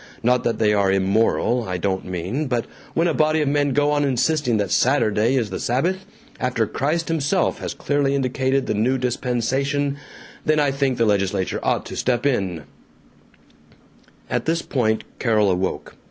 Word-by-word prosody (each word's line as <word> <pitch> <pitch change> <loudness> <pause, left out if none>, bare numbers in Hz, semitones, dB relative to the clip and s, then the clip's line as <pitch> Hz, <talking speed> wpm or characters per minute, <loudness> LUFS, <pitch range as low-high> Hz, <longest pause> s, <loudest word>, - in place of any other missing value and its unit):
Not 125 +1 +2
that 115 - 0
they 105 -1 +2
are 100 -2 +2
immoral, 110 +5 +1
I 90 - -1
don't 95 +1 -2
mean, 95 - -3
but 120 -3 -1 0.3
when 165 +1 +2
a 165 - +1
body 155 +1 +2
of 150 - 0
men 145 0 +1
go 145 +2 +2
on 145 0 +2
insisting 135 -1 +1
that 100 -1 -1
Saturday 120 -2 +2
is 115 -6 0
the - - -4
Sabbath, 175 +11 -1 0.3
after 125 -3 0
Christ 155 +9 -1
himself 165 +3 0
has - - -5
clearly 140 -1 0
indicated 130 0 0
the - - -1
new 120 +5 +1
dispensation, 130 +3 -1 0.5
then 155 0 +2
I 145 -2 +2
think 135 -2 0
the 115 - +2
legislature 100 -2 0
ought - - 0
to - - -7
step 120 0 0
in 95 - 0 0.8
" - - -30
At - - -1
this 165 +1 0
point 110 -5 0 0.2
Carol 110 -5 +2
awoke. 90 +1 -2
125 Hz, 170 wpm, -22 LUFS, 110-145 Hz, 0.8 s, Not